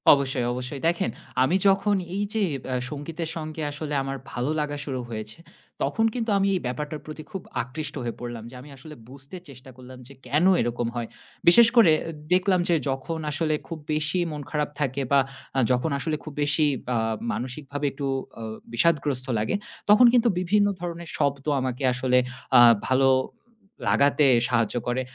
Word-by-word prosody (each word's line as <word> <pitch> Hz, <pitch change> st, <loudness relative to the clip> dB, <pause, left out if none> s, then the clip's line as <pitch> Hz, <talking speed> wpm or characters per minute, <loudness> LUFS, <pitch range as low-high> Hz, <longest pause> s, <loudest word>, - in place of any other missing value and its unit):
অবশ্যই, 135 Hz, -3 st, 0 dB
অবশ্যই। 125 Hz, +3 st, -5 dB
দেখেন 170 Hz, -7 st, +1 dB, 0.3 s
আমি 150 Hz, +8 st, +2 dB
যখন 195 Hz, +1 st, +3 dB, 0.2 s
এইযে 205 Hz, +2 st, -1 dB, 0.2 s
ব্যা 130 Hz, -, -2 dB, 0.2 s
সংগীতের 160 Hz, +3 st, -5 dB
সঙ্গে 155 Hz, -1 st, -5 dB
আসলে 150 Hz, 0 st, -5 dB
আমার 135 Hz, 0 st, -4 dB
ভালো 125 Hz, +3 st, -2 dB
লাগা 145 Hz, -1 st, -2 dB
শুরু 130 Hz, -3 st, -3 dB
হয়েছে, 110 Hz, +3 st, -7 dB, 0.4 s
তখন 225 Hz, -, +1 dB
কিন্তু 235 Hz, -2 st, -2 dB
আমি 195 Hz, 0 st, +2 dB
এই 180 Hz, -, -1 dB
ব্যাপারটার 150 Hz, +4 st, -4 dB
প্রতি 155 Hz, 0 st, -8 dB
খুব 190 Hz, -3 st, -5 dB, 0.2 s
আকৃষ্ট 135 Hz, +6 st, -6 dB
হয়ে 120 Hz, -1 st, -4 dB
পড়লাম। 120 Hz, -2 st, -6 dB
যে 130 Hz, -, -13 dB
আমি 145 Hz, -, -13 dB
আসলে 150 Hz, +3 st, -11 dB
বুঝতে 140 Hz, +6 st, -11 dB
চেষ্টা 130 Hz, -1 st, -13 dB
করলাম 130 Hz, 0 st, -12 dB
যে, 140 Hz, -, -12 dB
কেন 150 Hz, +7 st, +2 dB, 0.2 s
এরকম 120 Hz, 0 st, -1 dB
হয়? 120 Hz, -1 st, -3 dB, 0.4 s
বিশেষ 230 Hz, +7 st, +8 dB
করে 225 Hz, -9 st, +7 dB
এ -, -, -5 dB, 0.3 s
দেখলাম 185 Hz, 0 st, +3 dB
যে, 170 Hz, -, +4 dB
যখন 135 Hz, +5 st, -3 dB
আসলে 155 Hz, +1 st, 0 dB
খুব 165 Hz, -, -6 dB
বেশি 155 Hz, +4 st, 0 dB
মন 150 Hz, -1 st, -5 dB
খারাপ 150 Hz, -1 st, -1 dB
থাকে 140 Hz, -1 st, -1 dB
বা, 140 Hz, -, +6 dB, 0.4 s
আ -, -, +4 dB
যখন 125 Hz, +5 st, +1 dB
আসলে 155 Hz, +2 st, -1 dB
খুব 155 Hz, -, -8 dB
বেশি 145 Hz, +1 st, +2 dB, 0.2 s
বা 125 Hz, -1 st, 0 dB, 0.4 s
মানসিকভাবে 140 Hz, +3 st, -5 dB
একটু 140 Hz, 0 st, -4 dB, 0.3 s
অ -, -, -5 dB, 0.3 s
বিষাদগ্রস্ত 140 Hz, -1 st, +1 dB
লাগে, 110 Hz, -, 0 dB, 0.3 s
তখন 210 Hz, +4 st, +8 dB
কিন্তু 240 Hz, -1 st, +4 dB
বিভিন্ন 205 Hz, +3 st, +3 dB
ধরনের 170 Hz, -1 st, -5 dB
শব্দ 140 Hz, -1 st, 0 dB, 0.2 s
আমাকে 130 Hz, +1 st, -3 dB
আসলে 125 Hz, 0 st, +1 dB, 0.4 s
আ -, -, +9 dB, 0.3 s
ভালো 135 Hz, +1 st, +4 dB, 0.2 s
উ -, -, -26 dB, 0.6 s
লাগাতে 140 Hz, +1 st, +4 dB, 0.2 s
সাহায্য 115 Hz, -2 st, +1 dB
করে। 120 Hz, +1 st, 0 dB
145 Hz, 170 wpm, -25 LUFS, 130-165 Hz, 0.6 s, আ